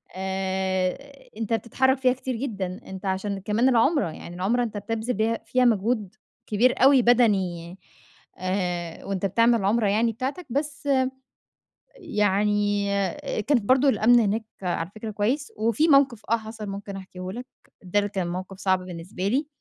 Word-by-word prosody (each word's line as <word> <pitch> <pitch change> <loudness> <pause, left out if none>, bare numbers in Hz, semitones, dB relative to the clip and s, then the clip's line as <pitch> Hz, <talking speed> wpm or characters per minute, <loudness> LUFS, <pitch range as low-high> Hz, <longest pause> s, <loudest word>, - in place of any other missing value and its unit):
آآ، 190 -1 -2 0.2
أنتَ 225 0 -2
بتتحرك 260 +4 +1
فيها 255 -1 +3
كتير 260 -1 -4
جدًا. 200 -7 -4
أنتَ 190 +1 -8
عشان 195 +1 -2
كمان 215 +6 +2
العُمرة، 250 - +3
يعني 170 +2 -10
العُمرة 225 +7 +1
أنتَ 220 -3 -4
بتبذل 225 +4 -2
بيها 225 +2 0
فيها 255 0 +2
مجهود 215 -2 +1 0.3
كبير 245 +4 +2
أوي 270 -1 +7
بدني، 190 -8 +2 0.6
آآ، 180 -2 -3
وأنتَ 195 -1 -2
بتعمل 230 +5 +4
العُمرة 210 +2 +2
يعني 220 +3 +2
بتاعتَك. 265 - -4
بس، 285 +2 -3 1.1
يعني 205 - +1 0.6
كانت 275 -2 +2
برضو 260 +5 +4
الأمن 240 -2 +5
هناك، 220 +1 0 0.2
على 175 -1 -2
فكرة 215 0 -6
كويس. 240 +8 -1
وفي 230 +8 +2
موقف 275 -6 +4
آه 230 - +5
حصل، 220 -1 -8
ممكن 200 0 -6
أحكيه 185 -1 -8
لَك، 245 +4 -7 0.4
ده 185 +2 0
اللي 205 0 0
كان 190 -3 -2
موقف 185 +2 -6
صعب 190 -1 +1
بالنسبة 180 +2 -4
لي. 275 +8 +1
210 Hz, 150 wpm, -25 LUFS, 190-240 Hz, 1.1 s, أوي